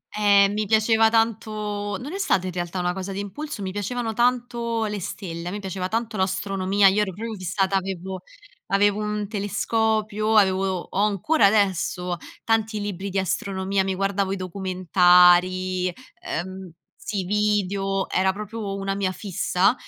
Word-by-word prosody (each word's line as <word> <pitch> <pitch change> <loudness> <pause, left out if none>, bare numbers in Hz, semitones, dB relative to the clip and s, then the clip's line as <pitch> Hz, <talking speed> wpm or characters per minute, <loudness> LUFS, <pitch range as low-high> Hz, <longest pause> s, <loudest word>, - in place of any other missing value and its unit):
Eh, 200 -1 +5
mi 210 +1 -1
piaceva 220 +1 +4
tanto 210 -2 -1
non 285 +7 -7
è - - -3
stata 195 - +1
in 180 - -5
realtà 175 +1 -3
una 180 0 0
cosa 190 +1 -5
di 195 - -4
impulso, 225 +4 -6
mi 190 - -3
piacevano 225 +4 -3
tanto 235 -1 0
le 210 -1 -3
stelle, 170 -2 -6
a - - -6
me 205 - -4
piaceva 190 -2 -4
tanto 225 0 -2
l'astronomia, 195 +1 +2
io 200 +2 +3
ero 195 -3 -2
proprio 225 +3 -5
fissata, 190 +1 -1
avevo 190 -1 -3 0.5
avevo 205 +1 +2
un 210 -1 -2
telescopio, 215 +1 0
avevo 190 -2 +2
ho 195 - -2
ancora 210 - +2
adesso 185 -3 +1 0.3
tanti 220 -1 0
libri 200 -1 -4
di 195 0 -1
astronomia, 190 +1 -1
mi 190 0 -2
guardavo 195 0 0
i 195 - 0
documentari, 185 0 +3 0.3
ehm 185 +2 -5 0.4
sì, 210 -2 -1
i - - -5
video, 195 -1 0
era 190 +1 +2
proprio 210 0 -5
una 195 0 -2
mia 195 -1 -1
fissa, 190 +1 +1
195 Hz, 155 wpm, -24 LUFS, 185-215 Hz, 0.5 s, Eh